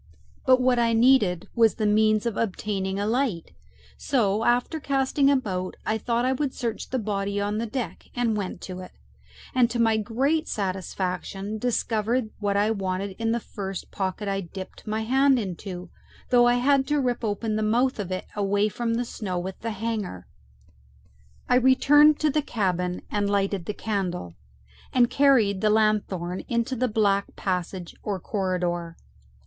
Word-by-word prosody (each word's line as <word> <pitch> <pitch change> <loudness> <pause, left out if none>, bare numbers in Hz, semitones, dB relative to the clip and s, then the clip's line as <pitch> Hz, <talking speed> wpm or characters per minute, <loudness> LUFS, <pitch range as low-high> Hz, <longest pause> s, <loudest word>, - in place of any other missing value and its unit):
But 255 0 +6
what 250 -1 +3
I 230 -1 +2
needed 225 -7 +4
was 225 -2 +4
the 220 - -1
means 215 +1 +3
of 230 -3 -1
obtaining 195 -2 -2
a 205 - 0
light, 225 -6 -1 0.5
so, 220 -6 +1
after 245 +7 +1
casting 275 0 +2
about, 190 -10 -1
I 220 0 0
thought 235 +2 0
I 260 - +2
would 270 0 -2
search 230 -3 -4
the 260 - -1
body 200 -2 -2
on 205 +1 -1
deck, 230 +2 -4
and 240 -3 +1
went 200 -3 -4
to 185 -1 -7
it, 185 - -10 0.6
and 250 -2 +4
to 240 - -3
my 225 -1 +3
great 265 +9 0
satisfaction 195 +1 -3
discovered 230 0 0
what 200 -1 0
I 210 +2 +2
wanted 190 -1 -2
in 225 0 0
the 235 - +1
first 195 -4 -6
pocket 195 +1 -3
I 195 0 -1
dipped 190 +4 -9
my 215 +1 -1
hand 265 +4 +3
into, 185 -3 -5 0.4
though 240 -1 +6
I 240 - +4
had 270 +2 +3
to 295 -1 +1
rip 245 -3 -1
open 215 0 -1
the 215 - 0
mouth 235 +4 +1
of 190 -3 -4
it 185 - -3
away 205 +1 +1
from 230 +2 -2
the 245 +1 -1
snow 190 -5 -4
with 185 +2 -5
the 230 - -4
hanger. 210 - -4 1.2
I 250 - +4
returned 290 +4 +6
to 305 -1 +3
the 300 - +1
cabin 180 -8 -1
and 205 -1 0
lighted 200 -2 0
the 210 - -3
candle, 180 - -3 0.6
and 245 -1 +3
carried 250 -8 +4
the 215 - +3
lanthorn 205 -5 +1
into 235 +2 0
the 255 +1 +1
black 200 -3 +1
passage 180 -2 -3
or 200 -3 -3
corridor. 175 -3 -2
215 Hz, 165 wpm, -25 LUFS, 195-245 Hz, 1.2 s, But